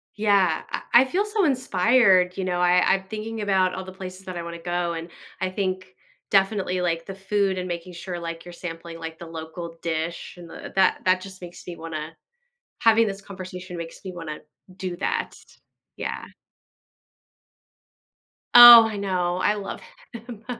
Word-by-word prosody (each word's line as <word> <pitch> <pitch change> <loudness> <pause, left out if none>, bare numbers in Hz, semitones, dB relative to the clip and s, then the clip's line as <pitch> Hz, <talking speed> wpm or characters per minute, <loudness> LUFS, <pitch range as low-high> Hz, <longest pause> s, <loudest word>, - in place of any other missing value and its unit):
Yeah, 205 -3 +2
I - - -4 0.2
I - - +2
feel 370 +10 0
so 420 -1 0
inspired, 220 - +3
you 190 - -2
know, 180 -1 -1
I 180 0 +4
I'm 190 0 -1
thinking 220 +1 -5
about 190 -2 +2
all 190 - -5
the 185 - -9
places 185 0 -9
that 185 -2 -6
I 170 - -4
wanna 170 0 -7
go 175 0 -2
and 165 +1 -6 0.3
I 185 - 0
think 185 -1 -3 0.4
definitely, 195 -2 +1
like, 165 -1 -1
the 195 - -7
food 195 0 0
and 180 - -4
making 175 +1 -6
sure, 175 0 -6
like, 165 -1 -6
you're 175 - -10
sampling, 165 -1 -8
like, 165 0 -7
the 170 - -8
local 165 +1 -8
dish, 165 +1 -4
and 170 -1 -11
the - - -9
that 190 -1 +3
that 185 0 +3
just 190 -1 -11
makes 175 -1 -11
me 175 - -7
wanna 160 -1 -7 0.7
having 225 -1 +5
this 195 -1 -5
conversation 185 -2 -9
makes 170 -1 -8
me 185 - -6
wanna 165 -3 -6 0.4
do 185 -2 -5
that. - - -2 0.6
Yeah. - - -5 2.3
Oh, 240 -2 +12
I 215 -2 -5
know. 180 -3 -1
I 205 +3 +1
love 200 -1 -6 0.3
him. 230 -2 -10
185 Hz, 170 wpm, -24 LUFS, 170-200 Hz, 2.3 s, Oh